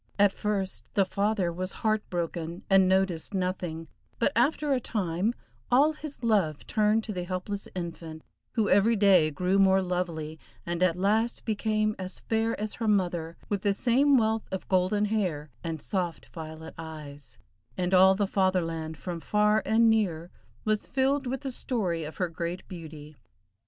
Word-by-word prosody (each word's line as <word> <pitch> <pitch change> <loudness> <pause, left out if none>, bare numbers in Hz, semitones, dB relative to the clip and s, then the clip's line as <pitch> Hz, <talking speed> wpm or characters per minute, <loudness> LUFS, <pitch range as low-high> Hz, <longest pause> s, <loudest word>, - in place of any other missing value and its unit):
At 200 -1 +4
first 200 -2 -2
the 195 - +4
father 200 -3 0
was 185 +2 -4
heart 215 0 +3
broken, 170 -1 -4
and 190 -1 +6
noticed 190 -1 +1
nothing, 180 -3 -2 0.3
but 235 - +2
after 285 +4 +2
a 260 - +2
time 205 -1 -1 0.3
all 285 +5 +5
his 300 -4 -8
love 195 -10 +1
turned 215 0 +2
to 215 - -5
the 180 -2 -3
helpless 185 +3 -4
infant, 165 -3 -6 0.3
who 220 -4 +1
every 205 +5 +4
day 195 -6 +5
grew 180 +6 +1
more 190 0 +5
lovely, 170 -4 -3 0.3
and 175 0 -3
at 185 -2 +3
last 215 +5 0
became 215 -1 0
as 185 0 -6
fair 225 0 0
as 215 0 -3
her 230 - -3
mother, 175 -5 0
with 205 -2 -1
the 200 0 +1
same 265 +5 +4
wealth 220 -1 +1
of 190 - -4
golden 190 +3 +2
hair 180 -9 -1
and 165 -1 -3
soft 180 -5 -2
violet 160 -1 -8
eyes, 150 -3 -8 0.4
and 180 0 -1
all 190 +1 +7
the 205 +1 +1
Fatherland, 165 -5 0
from 175 +1 -5
far 210 +4 +2
and 225 +1 +4
near, 180 -7 +1 0.3
was 215 -1 0
filled 270 0 +1
with 260 +1 -3
the 270 - -4
story 190 -10 -2
of 155 - -8
her 180 - 0
great 170 +2 -5
beauty. 155 -4 -10
190 Hz, 165 wpm, -28 LUFS, 170-215 Hz, 0.4 s, all